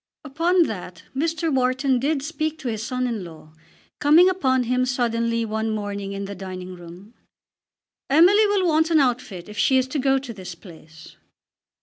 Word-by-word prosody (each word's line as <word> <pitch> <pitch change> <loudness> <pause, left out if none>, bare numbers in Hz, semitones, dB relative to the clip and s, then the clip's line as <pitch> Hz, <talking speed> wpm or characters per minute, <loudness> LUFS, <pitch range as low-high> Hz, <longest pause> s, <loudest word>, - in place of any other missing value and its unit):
Upon 335 +5 +2
that 180 - -6
Mr. 320 +2 -1
Wharton 260 0 +1
did 280 +1 -1
speak 310 0 -3
to 275 -6 -5
his 220 -2 -3
son 255 +2 -2
in 230 -5 -3
law; 160 -2 -13 0.5
coming 320 +6 +6
upon 260 -9 +1
him 250 +1 0
suddenly 230 -2 0
one 220 0 -2
morning 205 -2 -4
in 200 0 -4
the 200 - -6
dining 185 -1 -7
room. 175 +5 -13 1.0
"Emily 370 +9 +5
will 405 -2 +1
want 320 0 +2
an 320 -2 +4
outfit 240 -9 -1
if 210 0 -8
she 265 - +4
is 260 0 +1
to 285 - -2
go 270 0 +2
to 260 -3 -6
this 185 -4 -9
place." 160 -3 -15
250 Hz, 175 wpm, -23 LUFS, 200-295 Hz, 1.0 s, coming